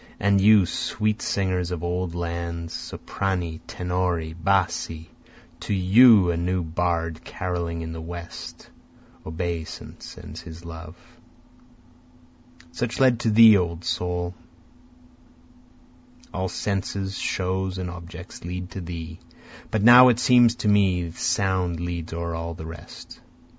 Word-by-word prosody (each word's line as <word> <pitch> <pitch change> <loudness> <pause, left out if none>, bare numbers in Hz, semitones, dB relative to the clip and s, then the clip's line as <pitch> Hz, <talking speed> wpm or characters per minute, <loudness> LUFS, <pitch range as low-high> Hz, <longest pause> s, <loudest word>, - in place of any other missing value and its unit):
And 100 0 +3
you, 105 -1 +6
sweet 105 +4 -2
singers 95 -3 -1
of 90 -2 -4
old 90 0 -2
lands, 85 -1 -4
soprani, 90 -4 -4
tenori, 90 -3 -2
bassi! 85 -2 -1 0.5
To 105 - -2
you 100 0 +6
a 85 - -2
new 90 +1 -1
bard 85 0 -2
caroling 85 -2 -4
in 80 - -6
the 80 0 -6
West, 85 +1 -9 0.6
Obeisant 85 0 -5
sends - - -10
his 85 0 -11
love. 80 0 -9 1.7
(Such 120 +7 -3
led 130 -3 +4
to 120 - 0
thee 110 -1 +8
O 85 -2 -2
soul, 90 +1 -2 2.0
All 95 0 -2
senses, 100 0 -3
shows 95 0 -2
and 90 -1 -4
objects, 90 +1 -10
lead 90 +1 -6
to 95 - -6
thee, 85 -1 -7 0.5
But 110 -2 -1
now 125 +2 +9
it 120 -2 +4
seems 120 -1 +5
to 120 - -3
me 95 -5 +2
sound 90 0 0
leads 85 -1 -4
o'er 85 0 -4
all 85 0 -4
the 80 - -8
rest.) 80 -1 -11
90 Hz, 125 wpm, -24 LUFS, 85-95 Hz, 2.0 s, now